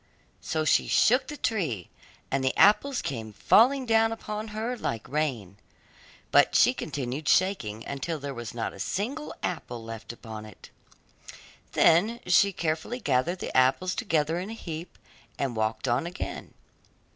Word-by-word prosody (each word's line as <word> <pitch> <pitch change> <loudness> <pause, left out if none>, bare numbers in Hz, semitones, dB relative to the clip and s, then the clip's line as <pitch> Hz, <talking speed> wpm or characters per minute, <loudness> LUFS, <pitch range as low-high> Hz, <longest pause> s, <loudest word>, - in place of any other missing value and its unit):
So 155 -1 -2
she - - +3
shook 250 +4 +4
the 295 - -6
tree, 160 - -2 0.4
and 135 0 0
the 130 - 0
apples 215 +7 +4
came 110 -5 -5
falling 255 - +4
down 225 -1 +3
upon 215 -1 -5
her 220 +3 -3
like 115 - -4
rain; 125 -9 -2 0.7
but - - +5
she - - +6
continued 135 +2 -4
shaking 120 - +1
until 140 +4 -3
there 140 -1 -5
was 120 -2 -7
not 115 - -3
a - - -13
single 255 - -3
apple 120 -9 -4
left 115 0 -7
upon 110 -2 -9
it. 105 - -15 1.0
Then 205 +9 +4
she 195 +3 +4
carefully 165 +8 -2
gathered 150 - +1
the - - -6
apples 130 +9 +3
together 165 -7 0
in 190 +3 -5
a - - -5
heap 165 -6 -7 0.4
and 130 -4 -2
walked 110 +3 -1
on 125 +7 +1
again. 180 - -6
160 Hz, 150 wpm, -27 LUFS, -, 1.0 s, she